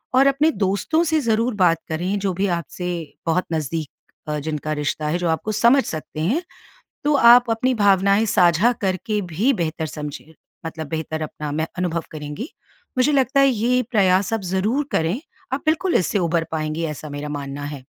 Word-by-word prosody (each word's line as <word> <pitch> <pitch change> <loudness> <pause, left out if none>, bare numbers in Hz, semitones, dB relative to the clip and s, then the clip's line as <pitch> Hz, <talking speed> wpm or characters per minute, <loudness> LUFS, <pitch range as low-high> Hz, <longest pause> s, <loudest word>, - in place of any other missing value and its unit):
और 270 +2 +6
अपने 285 +4 +3
दोस्तों 200 - 0
से 315 -1 +2
ज़रूर 230 0 +1
बात 175 -4 +3
करें, 180 +6 -1
जो 195 -1 -1
भी 195 +3 0
आपसे 175 0 -3 0.4
बहुत 170 +3 +1
नज़दीक 155 -1 -2 0.4
अ, 150 - -1
जिनका 155 0 -3
रिश्ता 150 +1 -2
है 155 +3 0
जो 175 -1 0
आपको 160 +7 -1
समझ 235 +6 +4
सकते 155 -1 -5
हैं, 230 - +1 0.6
तो 295 0 +3
आप 240 -2 +7
अपनी 250 +3 +1
भावनाएँ 200 0 +4
साझा 180 +4 +4
करके 205 +2 -1
भी 230 - +2
बेहतर 160 -6 -2
समझिए 150 +1 -8 0.3
मतलब 160 -1 -5
बेहतर 160 0 -3
अपना 150 -1 -5
में 155 +2 -1
अनुभव 170 -2 -1
करेंगी। 150 - -6 0.5
मुझे 255 +4 +3
लगता 270 0 +2
है 275 - +6
ये 250 +1 +1
प्रयास 195 -2 +3
आप 225 - 0
ज़रूर 235 +10 0
करें, 170 - 0 0.3
आप 270 - -1
बिल्कुल 325 +3 +1
इससे 190 +3 +2
उबर 170 -1 +1
पाएँगी 155 +1 -2
ऐसा 150 - -9
मेरा 145 +1 -5
मानना 145 -1 -5
है। 130 -2 -12
185 Hz, 175 wpm, -22 LUFS, 160-235 Hz, 0.6 s, आप